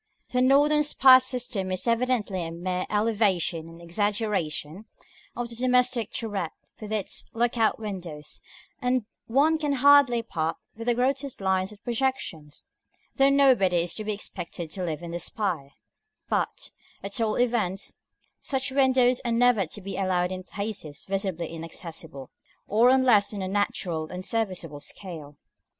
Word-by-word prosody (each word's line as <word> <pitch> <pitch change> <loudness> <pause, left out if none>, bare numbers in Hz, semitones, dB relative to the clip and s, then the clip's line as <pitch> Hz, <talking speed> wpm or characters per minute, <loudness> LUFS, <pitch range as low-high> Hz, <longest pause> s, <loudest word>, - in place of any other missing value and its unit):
The 250 - +1
northern 290 +3 +5
spire 270 -3 +7
system 250 -7 -2
is 185 +5 -2
evidently 230 -6 +1
a 165 - -4
mere 180 +2 -3
elevation 205 -6 +1
and 165 0 -13
exaggeration 190 -2 -1 0.5
of 240 -1 -3
the 235 - -4
domestic 250 -2 +2
turret 205 -8 -2 0.3
with 215 0 -7
its 210 -3 -2
look 240 +1 +1
out 225 -2 +2
windows, 180 -8 -6 0.4
and 250 -2 +1 0.2
one 295 +7 +3
can 295 -2 0
hardly 275 -3 +5
part 165 -7 -2 0.2
with 230 +2 -8
the 240 - +3
grotesque 270 +2 -1
lines 190 0 0
of 210 - -12
the - - -44
projections, 235 - -3 0.5
though 270 0 +5
nobody 260 -10 +4
is 175 - -2
to 215 - -4
be 215 - -2
expected 175 -5 -6
to 190 - -4
live 165 -1 -3
in 170 - -6
the 170 - -3
spire: 170 -10 -3 0.5
but, - - -2 0.3
at 200 +3 -2
all 215 -1 +1
events, 220 -6 0 0.5
such 265 -1 -1
windows 260 -2 +3
are 240 - -1
never 230 -5 +3
to 205 - -7
be 195 +1 -6
allowed 185 -2 0
in 185 0 -4
places 195 -7 -6
visibly 190 -3 -2
inaccessible, 160 -4 -7 0.4
or 225 +4 +4
on 260 0 +4
less 210 -5 +4
than 200 -3 -4
a - - -2
natural 180 -5 -1
and 180 +2 -7
serviceable 185 -10 -2
scale. 150 -2 -8
210 Hz, 155 wpm, -26 LUFS, 180-245 Hz, 0.5 s, spire